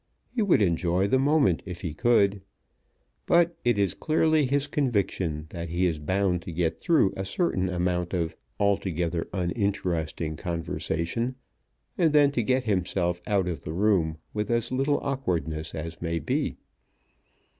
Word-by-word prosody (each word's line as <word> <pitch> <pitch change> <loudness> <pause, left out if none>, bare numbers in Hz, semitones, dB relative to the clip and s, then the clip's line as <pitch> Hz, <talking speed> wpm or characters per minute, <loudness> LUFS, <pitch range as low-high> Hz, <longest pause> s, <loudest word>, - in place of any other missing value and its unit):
He 245 - 0
would 185 - +4
enjoy 90 +1 +1
the 130 +6 +2
moment 140 - +3
if 90 -3 -7
he 85 -5 -4
could. 100 -2 +3 0.9
But 170 0 +4
it 120 -3 +2
is 100 -3 +2
clearly 155 -2 +2
his 140 +2 +1
conviction 100 - -1
that 85 -1 -5
he 85 +3 +1
is 80 -4 0
bound 95 +2 0
to 85 - -7
get 85 0 -1
through 160 - +3
a 95 - -3
certain 95 - 0
amount 90 0 -1
of 85 -2 -1 0.2
altogether 90 -4 0
uninteresting 85 -4 -1
conversation, 85 - -2 0.6
and 165 -4 +3
then 145 -1 +5
to 125 - 0
get 130 +3 +1
himself 90 -4 0
out 100 -3 +1
of 85 -2 -3
the 80 - -6
room 90 -5 +2 0.2
with 105 0 -2
as 120 0 0
little 135 +3 +1
awkwardness 85 - -2
as 80 +1 -6
may 85 0 -1
be. 80 - -1
95 Hz, 150 wpm, -27 LUFS, 85-125 Hz, 0.9 s, then